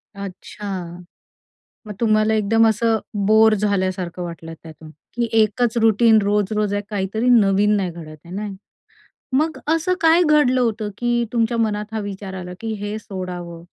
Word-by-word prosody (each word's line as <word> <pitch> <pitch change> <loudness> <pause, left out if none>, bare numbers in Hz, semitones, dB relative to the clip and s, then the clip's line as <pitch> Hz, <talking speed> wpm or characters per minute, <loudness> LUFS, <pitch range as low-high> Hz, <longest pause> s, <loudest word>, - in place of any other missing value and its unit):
अच्छा. 190 -2 -7 0.9
मग 210 - -6
तुम्हाला 215 -1 +2
एकदम 225 +2 +3
असं 225 +1 +2 0.3
बोअर 220 +1 +5
झाल्यासारखं 185 -3 -1
वाटलं 165 -1 -8
त्यातून, 160 -1 -12 0.3
की 235 -1 0
एकच 235 +2 0
रुटीन 225 0 +5
रोज-रोज 205 0 0
आहे 205 - 0
काहीतरी 210 +3 -2
नवीन 210 -2 +4
नाही 190 -4 -1
घडत 155 -2 -10
आहे 175 - -10
ना. 210 +1 -3 0.9
मग 315 +2 0
असं 330 +3 +1
काय 330 +2 +5
घडलं 295 -5 +3
होतं, 220 -3 -1
की 240 0 0
तुमच्या 230 0 +1
मनात 210 -1 -1
हा 220 - -1
विचार 195 -1 -6
आला, 180 -1 -7
की 225 -1 -4
हे 205 +1 -3
सोडावं? 180 -4 -7
210 Hz, 150 wpm, -21 LUFS, 190-225 Hz, 0.9 s, बोअर